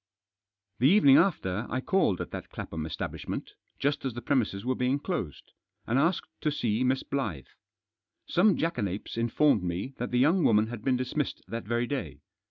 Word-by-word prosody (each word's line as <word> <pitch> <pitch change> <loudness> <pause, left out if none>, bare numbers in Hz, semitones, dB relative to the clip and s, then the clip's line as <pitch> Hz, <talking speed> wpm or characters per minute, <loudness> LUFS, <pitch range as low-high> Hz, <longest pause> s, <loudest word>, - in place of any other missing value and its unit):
The 125 - +5
evening 145 -8 +7
after 120 - +1
I 130 - -1
called 130 - +1
at - - -6
that - - -7
Clapham 80 -1 -5
estab - - -4
lishment, - - -5 0.3
just 145 +1 0
as 130 -4 -3
the 120 - -5
premises 115 -7 0
were 130 - +1
being 125 +2 +1
closed, 140 - -5 0.3
and 120 +4 +1
asked 165 +5 +1
to 150 - +1
see 120 -5 0
Miss 130 +1 +1
Blyth. 110 - -3 0.8
Some 190 +3 +3
jackanapes 105 - -2
informed 115 +1 +3
me 90 +9 -3
that 125 - -2
the 125 - 0
young 160 +8 +4
woman 105 -3 +4
had 120 -3 -7
been 130 -2 +2
dismissed 130 +3 -3
that 115 +2 -4
very 120 +2 0
day. 90 - -4
125 Hz, 180 wpm, -28 LUFS, 105-145 Hz, 0.8 s, evening